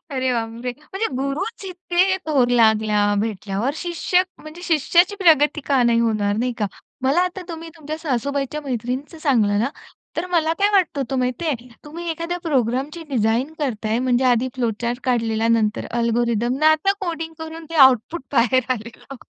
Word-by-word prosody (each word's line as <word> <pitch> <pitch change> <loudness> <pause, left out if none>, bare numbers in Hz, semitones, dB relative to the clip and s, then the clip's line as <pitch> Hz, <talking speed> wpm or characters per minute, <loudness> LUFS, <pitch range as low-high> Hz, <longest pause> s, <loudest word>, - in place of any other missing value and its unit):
अरे 260 -2 0
बापरे! 235 +1 -3
म्हणजे 385 +8 -3
गुरूच 315 - -3
इतके 370 0 +1
थोर 270 -6 +3
लागल्या 215 -3 +3
भेटल्यावर 215 +2 -2
शिष्य 350 +2 +1 0.2
म्हणजे 310 +3 -11
शिष्याची 345 +4 +3
प्रगती 310 -5 +4
का 270 -3 +3
नाही 235 -1 +3
होणार, 215 -3 +1
नाही 245 +2 0
का. 210 - +1 0.4
मला 275 +6 +3
आता 365 +1 -2
तुम्ही 330 0 -7
तुमच्या 310 0 -6
सासूबाईच्या 280 0 -2
मैत्रिणीचं 260 +4 -4
सांगलं 215 -8 +2
ना 240 - +1 0.5
तर 335 - -1
मला 330 -3 +1
काय 405 +1 +4
वाटत 370 -7 +2
होतं 265 0 -2
माहितीये 250 0 -2 0.2
तुम्ही 335 +3 -7
एखाद्या 335 +2 -3
प्रोग्रामची 275 +2 -1
डिझाइन 240 +3 0
करताय 225 -5 -1
म्हणजे 255 0 +1
आधी 250 0 +3
फ्लो 240 -3 0
चार्ट 240 +1 -2
काढलेला 230 -2 +1
नंतर 220 -2 +1
अल्गोरिथम 235 -1 +1
अन् 290 - -6
आता 315 +6 +3
कोडिंग 325 -3 -4
करून 320 +1 -7
ते - - -6
आउटपुट 265 +2 +4
बाहेर 255 +2 +3
आलेलं. 235 +3 -9
265 Hz, 160 wpm, -21 LUFS, 235-325 Hz, 0.5 s, प्रगती